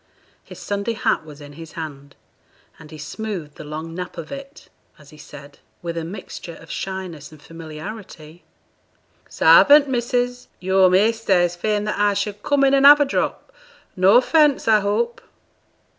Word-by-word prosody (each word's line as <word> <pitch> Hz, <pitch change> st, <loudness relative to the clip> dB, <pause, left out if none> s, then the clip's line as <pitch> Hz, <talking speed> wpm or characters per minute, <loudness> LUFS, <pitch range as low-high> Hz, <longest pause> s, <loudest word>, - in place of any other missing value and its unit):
His -, -, -13 dB
Sunday 205 Hz, +3 st, -3 dB
hat 220 Hz, -, 0 dB
was 150 Hz, -1 st, -12 dB
in 145 Hz, 0 st, -12 dB
his 165 Hz, +1 st, -12 dB
hand, 145 Hz, -3 st, -8 dB, 0.6 s
and 155 Hz, -2 st, -14 dB
he 155 Hz, -, -11 dB
smoothed 160 Hz, 0 st, -6 dB
the -, -, -9 dB
long 155 Hz, +2 st, -7 dB
nap 180 Hz, +1 st, -7 dB
of 165 Hz, -, -8 dB
it, 275 Hz, +1 st, -10 dB, 0.3 s
as 150 Hz, -2 st, -18 dB
he 155 Hz, -, -16 dB
said, 145 Hz, -1 st, -13 dB, 0.2 s
with 170 Hz, -1 st, -4 dB
a 165 Hz, -, -3 dB
mixture 175 Hz, -1 st, -9 dB
of -, -, -13 dB
shyness 185 Hz, -6 st, -6 dB
and 155 Hz, -, -15 dB
familiarity 165 Hz, +1 st, -10 dB, 0.9 s
'Sarvant, 290 Hz, 0 st, +6 dB
missus. 245 Hz, 0 st, -2 dB
Yo'r 190 Hz, 0 st, +3 dB
measter 205 Hz, 0 st, +2 dB
is 175 Hz, 0 st, 0 dB
fain 210 Hz, +3 st, -1 dB
that 210 Hz, -1 st, -3 dB
I 205 Hz, -1 st, +2 dB
should 205 Hz, +1 st, -3 dB
come 285 Hz, +3 st, +1 dB
in 275 Hz, 0 st, +4 dB
an' 275 Hz, 0 st, +3 dB
have 290 Hz, +1 st, +9 dB
a 290 Hz, -, +3 dB
drop; 390 Hz, -, -3 dB, 0.4 s
no 185 Hz, +1 st, +4 dB
offence, 295 Hz, +1 st, +3 dB
I 220 Hz, -1 st, +5 dB
hope?' 220 Hz, +4 st, -2 dB
190 Hz, 165 wpm, -21 LUFS, 160-230 Hz, 0.9 s, have